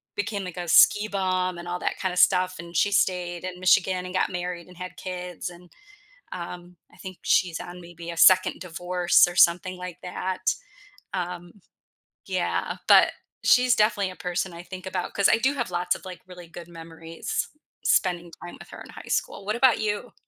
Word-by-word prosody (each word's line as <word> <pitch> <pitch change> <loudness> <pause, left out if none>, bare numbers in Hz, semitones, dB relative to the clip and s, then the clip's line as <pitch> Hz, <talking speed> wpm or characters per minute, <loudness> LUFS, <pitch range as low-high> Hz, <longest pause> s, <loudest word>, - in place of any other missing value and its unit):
became 205 -1 -3
like, 180 -1 -8
a 175 -1 -4
ski 205 +5 +6
bum 185 -2 -1
and 175 - -9
all 175 0 -2
that - - -3
kind 190 -2 -1
of - - -6
stuff, 185 0 +4
and 170 0 -10
she 205 +5 +2
stayed 180 -3 0
in 180 -1 -6
Michigan 185 0 +3
and 180 - -7
got - - +1
married 180 -1 -4
and 180 -1 -16
had 180 0 -8
kids, 180 -2 -6
and, 175 0 -15 0.6
um, 175 0 -7 0.2
I - - -19
think 185 -1 -9
she's 175 -3 +1
on 180 0 -9
maybe 170 0 -9
a 170 - -7
2nd 185 +2 +5
divorce 180 0 +2
or 175 - -8
something 180 +2 +4
like 180 -1 -8
that, 185 +1 -2 0.6
um, 175 -1 -5 0.7
yeah, - - -2
but - - +7 0.3
she's 250 -1 +5
definitely 210 -3 +2
a 185 - -11
person 180 0 -3
I 170 +1 -9
think 185 +1 -9
about, 185 -1 -3
'cause 200 - +3
I 230 - +4
do 265 +5 +1
have 240 -8 -3
lots 175 0 0
of - - -11
like, 185 -1 -9
really 180 -2 -12
good 175 0 -11
memories 165 0 -5 0.4
spending 175 -2 +1
time 175 - -9
with - - -13
her - - -10
in - - -11
high - - -11
school - - -2
what 215 +3 -1
about 250 -1 +4
you? 215 +2 -3
180 Hz, 195 wpm, -25 LUFS, 175-190 Hz, 0.7 s, but